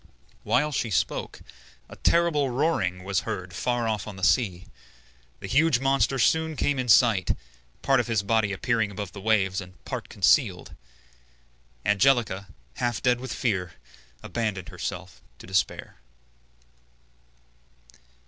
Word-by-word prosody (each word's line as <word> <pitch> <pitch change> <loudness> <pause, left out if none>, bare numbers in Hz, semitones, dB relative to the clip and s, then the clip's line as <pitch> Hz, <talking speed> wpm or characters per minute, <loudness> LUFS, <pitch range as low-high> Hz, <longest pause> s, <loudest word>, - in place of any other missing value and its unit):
While 150 +4 +1
she 120 -5 -1
spoke, 100 - -2 0.5
a - - -12
terrible 165 -5 +2
roaring 120 - 0
was 95 -1 0
heard 90 0 -5
far 120 +4 -1
off 110 -2 -2
on 105 - -7
the 95 - -11
sea. 90 -1 +2 0.8
The - - -6
huge 145 -2 +3
monster 135 0 +1
soon 160 +4 +2
came 145 -1 0
in 125 - -2
sight, 110 -5 +4 0.5
part 135 - +3
of 120 - -1
his 110 -4 0
body 110 0 +1
appearing 110 +2 0
above 100 -1 -6
the 100 - -10
waves 95 -3 +1
and 90 0 -12
part - - -5
concealed. - - +2 1.1
Angelica, 105 -3 +2 0.3
half 120 -5 -2
dead 125 -1 +3
with 130 +1 -6
fear, 95 -7 -1 0.5
abandoned 105 -6 -3
herself - - -6 0.2
to - - -13
despair. 95 +1 -2
110 Hz, 130 wpm, -26 LUFS, 95-130 Hz, 1.1 s, sight